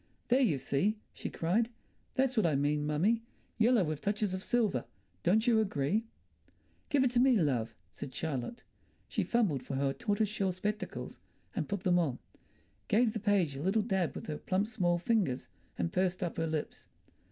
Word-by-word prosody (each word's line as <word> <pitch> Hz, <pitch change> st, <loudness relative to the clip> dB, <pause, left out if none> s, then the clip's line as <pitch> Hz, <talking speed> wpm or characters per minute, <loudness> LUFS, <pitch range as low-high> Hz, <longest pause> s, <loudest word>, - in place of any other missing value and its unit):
"There, 250 Hz, +2 st, +5 dB
you 200 Hz, -, +3 dB
see," 155 Hz, -, 0 dB, 0.2 s
she -, -, -5 dB
cried. 210 Hz, +8 st, +1 dB, 0.5 s
"That's 260 Hz, -1 st, +2 dB
what 220 Hz, -6 st, +3 dB
I 155 Hz, -, +2 dB
mean, 145 Hz, +1 st, +1 dB
mummy. 190 Hz, +10 st, +2 dB, 0.4 s
Yellow, 230 Hz, -2 st, +5 dB
with 155 Hz, -2 st, -3 dB
touches 205 Hz, -1 st, 0 dB
of 185 Hz, -, -3 dB
silver. 215 Hz, -, +1 dB, 0.4 s
Don't 215 Hz, -, +3 dB
you 235 Hz, -3 st, +4 dB
agree?" 200 Hz, +1 st, 0 dB, 0.8 s
"Give 285 Hz, -3 st, +3 dB
it 255 Hz, -, +2 dB
to 245 Hz, -, +2 dB
me, 255 Hz, -1 st, +5 dB
love," 125 Hz, -, 0 dB, 0.2 s
said 120 Hz, +5 st, -7 dB
Charlotte. 150 Hz, -, -4 dB, 0.4 s
She -, -, -1 dB
fumbled 205 Hz, -, +1 dB
for 135 Hz, -, -5 dB
her 135 Hz, 0 st, +1 dB
tortoise 215 Hz, -, 0 dB
shell 195 Hz, -2 st, -1 dB
spectacles 210 Hz, +4 st, -4 dB, 0.4 s
and -, -, -2 dB
put 200 Hz, -2 st, -2 dB
them 180 Hz, -1 st, +4 dB
on, 140 Hz, -8 st, 0 dB, 0.7 s
gave 220 Hz, +1 st, +3 dB
the 220 Hz, -, -2 dB
page 195 Hz, -9 st, +2 dB
a 135 Hz, -, -5 dB
little 195 Hz, +6 st, +2 dB
dab 190 Hz, -6 st, 0 dB
with -, -, -6 dB
her 150 Hz, -2 st, -4 dB
plump 190 Hz, +2 st, 0 dB
small 175 Hz, -7 st, +1 dB
fingers, 175 Hz, -, 0 dB, 0.3 s
and 85 Hz, -2 st, -1 dB
pursed 185 Hz, 0 st, +1 dB
up 175 Hz, -, -3 dB
her 165 Hz, 0 st, 0 dB
lips. 155 Hz, -2 st, -4 dB
190 Hz, 180 wpm, -32 LUFS, 150-220 Hz, 0.8 s, There